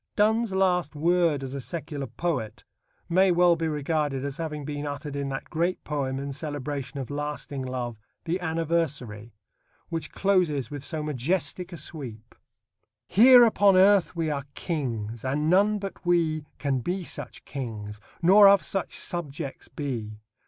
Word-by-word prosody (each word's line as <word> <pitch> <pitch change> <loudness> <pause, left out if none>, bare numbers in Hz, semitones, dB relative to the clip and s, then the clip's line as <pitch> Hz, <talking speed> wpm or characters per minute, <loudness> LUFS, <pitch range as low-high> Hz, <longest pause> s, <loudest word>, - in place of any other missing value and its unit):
Donne's 220 +1 +2
last 180 -5 +1
word 165 -2 +2
as 135 0 -6
a 140 - -4
secular 145 -2 -5
poet 120 -4 -3 0.4
may 185 +2 +4
well 175 0 +5
be 165 0 -2
regarded 150 -2 -1
as 140 -1 -4
having 150 -3 -4
been 145 0 -4
uttered 145 0 -5
in 140 -1 -2
that 135 0 -6
great 170 +3 -1
poem 135 -3 -2
in 140 0 -4
celebration 140 -1 -5
of 135 0 -5
lasting 145 -1 -4
love, 125 -3 -4 0.3
The 170 +3 -1
Anniversary, 155 -10 -2 0.6
which 165 -3 -4
closes 175 -9 +1
with 145 -2 -6
so 155 0 -2
majestic 155 +5 -1
a 170 - -7
sweep: 120 -10 -7 0.7
Here 245 +6 +8
upon 205 -4 +5
earth 195 -1 +5
we 165 -2 -1
are 140 -2 -3
kings, 115 - -3
and 150 +5 0
none 205 +3 +4
but 195 -2 -7
we 165 -4 +1
Can 135 -1 0
be 180 +9 -2
such 145 -6 -6
kings, 110 -6 -6 0.2
nor 200 +4 +8
of 200 0 +6
such 195 - -1
subjects 150 -4 -4
be. 115 -7 -5
150 Hz, 150 wpm, -26 LUFS, 135-175 Hz, 0.7 s, Here